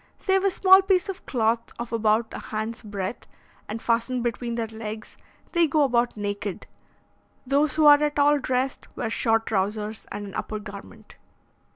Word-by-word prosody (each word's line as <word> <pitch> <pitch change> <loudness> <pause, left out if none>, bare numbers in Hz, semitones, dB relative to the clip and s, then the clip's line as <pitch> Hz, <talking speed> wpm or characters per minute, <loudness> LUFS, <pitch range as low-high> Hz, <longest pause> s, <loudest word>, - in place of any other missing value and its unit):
Save 385 0 +1
a 395 - +4
small 380 +1 +6
piece 380 -1 +1
of 385 -1 -7
cloth 230 -2 +1 0.2
of 235 0 -6
about 220 0 +1
a - - -5
hand's 220 +1 -5
breadth, 205 0 -5 0.4
and 215 +2 -4
fastened 235 +2 0
between 235 0 -2
their 230 -1 -1
legs, 220 0 -8 0.4
they 340 -2 +3
go 300 +1 +2
about 240 -3 +1
naked. 205 -1 -4 0.8
Those 285 +4 +2
who 310 -1 +3
are 290 0 +8
at 295 -1 0
all 290 0 +4
dressed, 255 0 -2
wear 225 -2 -2
short 225 -1 +2
trousers 210 +1 -2
and 205 - -5
an 195 - -9
upper 215 - -4
garment. 205 -1 -11
230 Hz, 170 wpm, -25 LUFS, 215-290 Hz, 0.8 s, are